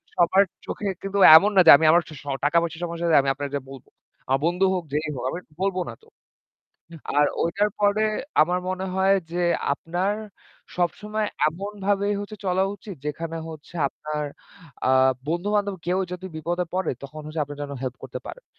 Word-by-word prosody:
সবার 180 Hz, +3 st, +4 dB, 0.2 s
চোখে 210 Hz, -, -4 dB, 0.2 s
কিন্তু 195 Hz, 0 st, -3 dB, 0.2 s
এমন 205 Hz, +5 st, +3 dB
না 190 Hz, -, +8 dB
যে -, -, +12 dB
আমি 160 Hz, -, +1 dB
আমার 170 Hz, +1 st, +4 dB, 0.2 s
স -, -, -23 dB, 0.2 s
টাকা-পয়সা 165 Hz, +2 st, +1 dB
সমস্যা 170 Hz, 0 st, -3 dB
হলে 160 Hz, -, +6 dB
আমি 135 Hz, -, -1 dB
আপনারে 140 Hz, 0 st, -5 dB
যাইয়ে 135 Hz, -2 st, -5 dB
বলব। 135 Hz, -2 st, -11 dB, 0.4 s
আমার 135 Hz, +1 st, +2 dB
বন্ধু 180 Hz, +3 st, +2 dB
হোক 180 Hz, -, -2 dB
যেই 150 Hz, +1 st, -1 dB
হোক 125 Hz, -, -5 dB
আমি 175 Hz, -, -4 dB, 0.2 s
বলব 195 Hz, -1 st, 0 dB
না -, -, -6 dB
তো। -, -, -21 dB, 1.1 s
আর 145 Hz, -, +5 dB, 0.2 s
ওইটার 200 Hz, +5 st, +1 dB
পরে 205 Hz, +1 st, +3 dB, 0.4 s
আমার 175 Hz, +3 st, 0 dB
মনে 185 Hz, +1 st, -3 dB
হয় 190 Hz, +1 st, +4 dB, 0.2 s
যে 175 Hz, +1 st, -1 dB, 0.3 s
আপনার 175 Hz, +7 st, -1 dB, 0.6 s
সবসময় 210 Hz, +5 st, -1 dB, 0.2 s
এমনভাবেই 200 Hz, +3 st, -1 dB
হচ্ছে 205 Hz, +1 st, -7 dB
চলা 185 Hz, +1 st, +2 dB
উচিত 200 Hz, -1 st, -10 dB
যেখানে 165 Hz, +2 st, -4 dB
হচ্ছে 160 Hz, +2 st, -11 dB
আপনার 150 Hz, +1 st, -5 dB, 0.6 s
আ -, -, +4 dB, 0.4 s
বন্ধু-বান্ধব 200 Hz, +4 st, 0 dB
কেউ 180 Hz, +1 st, +1 dB
যদি 180 Hz, +1 st, -6 dB
বিপদে 175 Hz, +3 st, -2 dB
পড়ে, 190 Hz, +1 st, 0 dB
তখন 150 Hz, +3 st, -8 dB
হচ্ছে 155 Hz, +1 st, -4 dB
আপনে 145 Hz, 0 st, -9 dB
যেন 145 Hz, -, -5 dB
হেল্প 130 Hz, -1 st, -4 dB
করতে -, -, -6 dB
পারেন, -, -, -9 dB
175 Hz, 175 wpm, -24 LUFS, 155-195 Hz, 1.1 s, যে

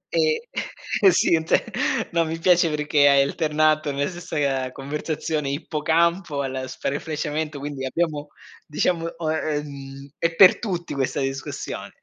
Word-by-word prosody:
Eh, 465 Hz, -1 st, +1 dB, 0.5 s
e 195 Hz, -2 st, +7 dB
sì, 175 Hz, -, +3 dB
è -, -, +6 dB
un -, -, -6 dB
te -, -, +2 dB, 0.5 s
no, 170 Hz, 0 st, +2 dB
mi 165 Hz, 0 st, -3 dB
piace 175 Hz, -1 st, +4 dB
perché 150 Hz, -1 st, +3 dB
hai 140 Hz, 0 st, +6 dB
alternato 155 Hz, +1 st, +1 dB
nella 140 Hz, +1 st, -1 dB
stessa 175 Hz, -3 st, -6 dB
ga 135 Hz, -3 st, 0 dB
conversazione 150 Hz, +2 st, -3 dB
ippocampo, 160 Hz, +2 st, 0 dB
allo 130 Hz, -1 st, -3 dB
sparafleshamento, 150 Hz, +2 st, -3 dB
quindi 140 Hz, -1 st, -5 dB
abbiamo 150 Hz, +1 st, -1 dB, 0.4 s
diciamo 165 Hz, +2 st, 0 dB
o 160 Hz, -2 st, -1 dB
ehm, 140 Hz, -3 st, -5 dB
è 165 Hz, 0 st, 0 dB
per 185 Hz, +1 st, +7 dB
tutti 180 Hz, -6 st, -3 dB
questa 135 Hz, -1 st, -1 dB
discussione. 135 Hz, 0 st, -4 dB
150 Hz, 145 wpm, -23 LUFS, 140-165 Hz, 0.5 s, e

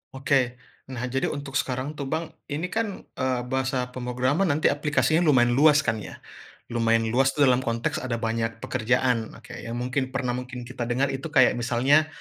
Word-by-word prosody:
Oke. 130 Hz, -2 st, +1 dB, 0.3 s
Nah, 125 Hz, -2 st, -5 dB
jadi 135 Hz, 0 st, 0 dB
untuk 140 Hz, -1 st, -3 dB
sekarang, 130 Hz, +2 st, -2 dB
tuh, 140 Hz, -, -3 dB
Bang, 160 Hz, +4 st, -3 dB, 0.2 s
ini, 155 Hz, +5 st, -3 dB
kan, 220 Hz, -3 st, -2 dB, 0.2 s
eee, 130 Hz, -1 st, 0 dB
bahasa 130 Hz, 0 st, -1 dB
pemrograman 130 Hz, +8 st, 0 dB
nanti 150 Hz, -1 st, +2 dB
aplikasinya 145 Hz, +1 st, +1 dB
lumayan 130 Hz, -8 st, +4 dB
luas, 150 Hz, +4 st, +5 dB
kan, 110 Hz, -2 st, 0 dB
ya. -, -, -10 dB, 0.5 s
Lumayan 115 Hz, -1 st, +2 dB
luas 135 Hz, +2 st, +2 dB
tu 145 Hz, -, +3 dB
dalam 130 Hz, -2 st, +5 dB
konteks 115 Hz, -2 st, -2 dB
ada 125 Hz, -2 st, -3 dB
banyak 115 Hz, 0 st, -2 dB
pekerjaan, 125 Hz, -1 st, 0 dB
oke, 115 Hz, -, -14 dB
yang 115 Hz, 0 st, -6 dB
mungkin 130 Hz, +2 st, -1 dB
pernah 125 Hz, -3 st, 0 dB
mungkin 125 Hz, 0 st, -5 dB
kita 120 Hz, -1 st, -5 dB
dengar 130 Hz, +3 st, +1 dB
itu 135 Hz, +4 st, -4 dB
kayak 130 Hz, -5 st, +4 dB
misalnya, 130 Hz, +6 st, +3 dB
130 Hz, 175 wpm, -25 LUFS, 120-140 Hz, 0.5 s, luas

